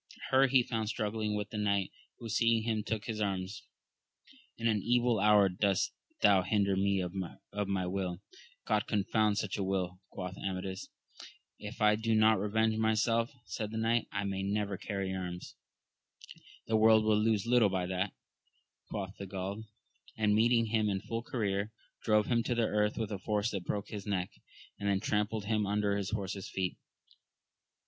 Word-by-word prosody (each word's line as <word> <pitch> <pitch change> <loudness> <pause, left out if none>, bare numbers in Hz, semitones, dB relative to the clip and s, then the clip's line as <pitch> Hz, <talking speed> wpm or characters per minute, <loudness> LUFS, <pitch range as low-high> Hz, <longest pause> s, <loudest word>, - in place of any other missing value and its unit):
Her 135 +1 +6
he 130 -1 +4
found 110 -2 -2
struggling 105 -1 -1
with 105 0 -3
the 105 - -3
knight, 100 -2 +1 0.3
who 115 - -8
seeing 115 0 +2
him 110 -1 0
took 110 0 -3
his 110 -2 -3
arms: 95 -1 -3 0.5
— - - -26
In 115 - 0
an 110 -3 +2
evil 120 -2 +2
hour 105 -1 +6
dost 95 +1 +1 0.3
thou 100 -2 +6
hinder 100 +1 +1
me 100 0 +2
of 90 -1 -3 0.5
my 95 -2 0
will! 90 -1 -2 0.5
God 105 -1 +1
confound 105 0 +1
such 105 -1 -2
a - - 0
wiU! 90 -2 -2
quoth 90 0 -6
Amadis. 95 0 -4 0.7
If 105 +2 -8
I 105 0 +5
do 110 0 +1
not 110 0 +5
revenge 110 +2 +1
myself, 115 +1 +2
said 110 -3 -4
the 110 - -5
knight, 115 +1 +1 0.2
may 100 -1 -2
I - - -1
never 100 0 -1
carry 100 -1 -3
arms. 90 -1 -5 1.1
The 110 - +2
world 110 0 +6
will 110 -1 +4
lose 110 -2 +2
little 120 -3 +4
by 95 -1 -1
that, 95 +2 -1 0.8
quoth 100 -2 -5
he 100 - -5
of - - -12
Gaul; 100 +3 -4 0.5
and 105 -1 +3
meeting 115 +2 +4
him 110 -2 +2
in 95 -1 -1
full 115 0 -3
career, 105 -3 -2 0.3
drove 105 -1 +3
him 120 0 +2
to 120 - 0
the 115 -1 +2
earth 105 0 +1
with 110 -2 -2
a 100 - -3
force 105 +2 0
that 95 -3 -4
broke 100 -1 -3
his 105 -1 -6
neck, 95 -3 -1 0.5
and 100 - -1
then 100 -1 +2
trampled 105 +1 -1
him 105 -1 +1
under 105 0 +1
his 100 -2 -2
horse's 100 -2 -4
feet. 95 -2 -2
105 Hz, 180 wpm, -32 LUFS, 95-110 Hz, 1.1 s, Her